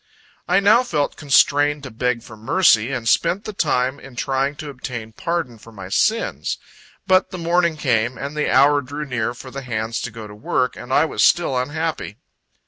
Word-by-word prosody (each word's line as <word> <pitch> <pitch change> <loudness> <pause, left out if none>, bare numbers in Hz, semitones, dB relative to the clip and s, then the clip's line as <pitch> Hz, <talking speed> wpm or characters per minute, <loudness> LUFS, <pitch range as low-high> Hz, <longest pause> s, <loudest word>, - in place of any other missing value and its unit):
I 180 +2 +4
now 205 +4 +5
felt 150 - -1
constrained 145 0 +3
to 130 - -7
beg 120 +1 -1
for 110 - -12
mercy, 115 - +3
and 125 -4 -3
spent 190 - +2
the 215 - -5
time 135 -6 0
in 135 -2 -13
trying 135 +3 -1
to 150 0 -7
obtain 120 -4 -7
pardon 165 -6 -3
for 115 - -15
my 95 -4 -9
sins. 220 - 0 0.5
But 185 0 +3
the 185 - -7
morning 170 -1 +1
came, 120 -3 0
and 140 +2 -6
the 150 - 0
hour 145 +1 +5
drew 145 +3 -6
near 120 -3 -2
for 130 +1 -10
the 135 +2 -6
hands 115 -2 -3
to - - -4
go 110 -1 -9
to 105 - -10
work, 125 +4 -1
and 120 - -9
I 145 +4 +4
was - - -2
still 170 -6 +3
unhappy. 145 -3 -3
135 Hz, 195 wpm, -21 LUFS, 120-155 Hz, 0.5 s, now